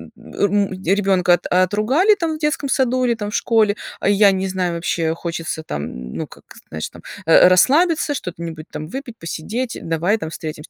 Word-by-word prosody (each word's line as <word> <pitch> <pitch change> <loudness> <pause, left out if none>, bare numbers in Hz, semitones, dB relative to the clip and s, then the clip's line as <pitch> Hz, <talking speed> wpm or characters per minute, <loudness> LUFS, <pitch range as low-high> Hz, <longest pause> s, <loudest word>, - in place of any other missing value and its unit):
м, 200 -1 -1
ребёнка 190 -2 +3
отругали 215 - +3
там 330 -4 -2
в - - -9
детском 300 -2 -1
саду 255 -1 +1
или 235 -1 +1
там 210 -1 -5
в - - -4
школе, 220 -3 +2 0.3
я 200 0 +5
не 190 0 -1
знаю, 185 -2 -2
вообще, 165 -1 -1
хочется 165 -2 -4
там, 70 - -6
ну, - - -4
как, - - -16 0.3
знаешь 80 0 -5
там, - - -14 0.2
э, 165 +2 +7
расслабиться, 290 - +3
что 180 -10 -4
т 170 - -14
нибудь 160 -1 -7
там 155 - -6
выпить, 250 - -7
посидеть, 225 +9 -4
давай 170 +6 0
там 160 -7 -5
встретимся". 155 -1 -7
195 Hz, 180 wpm, -20 LUFS, 165-240 Hz, 0.3 s, э